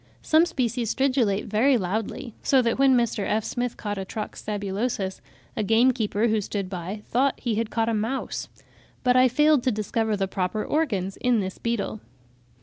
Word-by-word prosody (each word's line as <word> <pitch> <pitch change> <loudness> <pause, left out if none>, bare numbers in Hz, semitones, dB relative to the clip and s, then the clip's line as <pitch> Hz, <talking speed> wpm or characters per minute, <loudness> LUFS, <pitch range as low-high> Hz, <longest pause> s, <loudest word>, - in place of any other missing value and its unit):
Some 320 +2 +4
species 245 -7 -1
stridulate 255 -7 +1
very 235 +5 +3
loudly, 220 +4 -3
so 270 - +3
that 230 +2 0
when 270 -2 +5
Mr. 235 -3 0
F. 215 +2 0
Smith 245 +1 -3
caught 205 -2 -4
a - - -2
Trox 210 +3 -6
sabulosus, 205 -1 -2 0.3
a - - -1
gamekeeper, 225 0 +2
who 215 -1 +1
stood 200 -1 -4
by, 190 +4 -5
thought 265 +3 +1
he 235 - -1
had 220 +1 -1
caught 225 -1 0
a 230 - +1
mouse; 225 +5 -2 0.5
but 250 -1 +3
I 255 0 +6
failed 295 +2 +4
to 255 - +3
discover 215 0 -1
the 195 -1 0
proper 190 +2 -2
organs 205 - -1
in 245 -2 +2
this 190 -2 -4
beetle. 230 -2 -2
225 Hz, 175 wpm, -25 LUFS, 205-250 Hz, 0.5 s, I